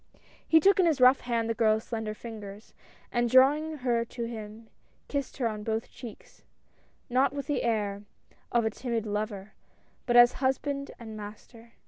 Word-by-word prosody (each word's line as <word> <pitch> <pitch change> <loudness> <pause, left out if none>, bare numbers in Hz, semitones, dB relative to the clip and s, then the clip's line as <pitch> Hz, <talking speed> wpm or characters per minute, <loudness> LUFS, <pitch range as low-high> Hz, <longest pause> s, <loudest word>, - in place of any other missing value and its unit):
" - - -29
He 320 - +7
took 390 +4 +4
in 360 - +5
his 310 -4 +1
rough 255 +1 +6
hand 235 -2 -1
the 230 - 0
girl's 220 -1 +2
slender 220 -2 -4
fingers, 210 -2 -10 0.4
and 240 0 +1
drawing 295 +5 +4
her 235 -2 +2
to 235 +1 -7
him 220 -1 -7 0.4
kissed 280 -2 -4
her 250 -4 +1
on 215 -2 -4
both 220 +1 -3
cheeks, 235 -4 -12 0.6
not 260 +2 +2
with 280 -1 -4
the 290 - -1
air 205 -4 -1 0.5
of 235 -1 +2
a 220 - +1
timid 235 -1 -3
lover, 210 -1 -4 0.5
but 240 -1 +4
as 240 0 +8
husband 275 +1 -1
and 220 -2 -9
master. 220 +2 -11
235 Hz, 170 wpm, -28 LUFS, 220-260 Hz, 0.6 s, as